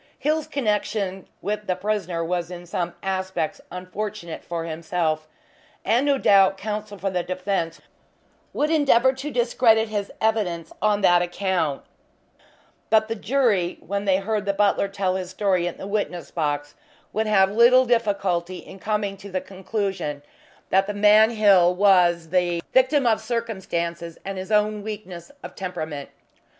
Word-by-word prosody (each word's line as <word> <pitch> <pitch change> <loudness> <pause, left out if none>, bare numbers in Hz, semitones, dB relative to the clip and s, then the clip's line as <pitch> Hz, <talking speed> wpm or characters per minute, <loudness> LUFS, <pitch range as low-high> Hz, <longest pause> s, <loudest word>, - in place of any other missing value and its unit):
Hill's 310 +1 0
connection 210 -6 -2 0.2
with 210 +1 -3
the 185 - +1
prisoner 185 -4 -2
was 175 0 -2
in 175 -1 -8
some 175 0 -3
aspects 190 -4 -2
unfortunate, 185 0 -6
for 170 -1 -4
himself, 160 -1 -2 0.6
and 245 +5 +2
no 280 -1 +3
doubt 195 -5 +4
counsel 210 0 -5
for 195 +1 -2
the 180 -1 0
defense 185 -2 -2 0.7
would 300 +2 0
endeavour 265 -5 +4
to 270 +3 -6
discredit 235 -3 +3
his 205 -2 -3
evidence 185 -7 -1
on 210 -1 +2
that 175 -2 +5
account, 175 -5 -1 1.1
but 220 0 +3
the 225 - -1
jury, 215 -7 +1
when 200 +1 -4
they 190 -1 +3
heard 205 +1 -2
the 200 - +2
butler 200 0 +2
tell 195 -2 -1
his 185 -1 -5
story 185 -2 0
in 175 - -5
the - - -7
witness 200 -4 -3
box, 145 -3 -2 0.4
would 220 +1 0
have 195 -2 +4
little 240 +4 +6
difficulty 195 -7 0
in 190 - -12
coming 210 -1 -1
to 200 +1 -11
the 185 -1 -1
conclusion 190 -7 -4 0.5
that 195 +1 +3
the 205 - -3
man 210 +2 +6
Hill 195 -6 +4
was 180 -4 +4
the 175 -1 +1
victim 260 +2 +4
of 225 -2 +2
circumstances 170 -8 -3
and 195 -1 -4
his 190 +3 -7
own 210 0 +2
weakness 200 -3 -8
of - - -8
temperament. 155 -7 -5
195 Hz, 150 wpm, -23 LUFS, 175-215 Hz, 1.1 s, little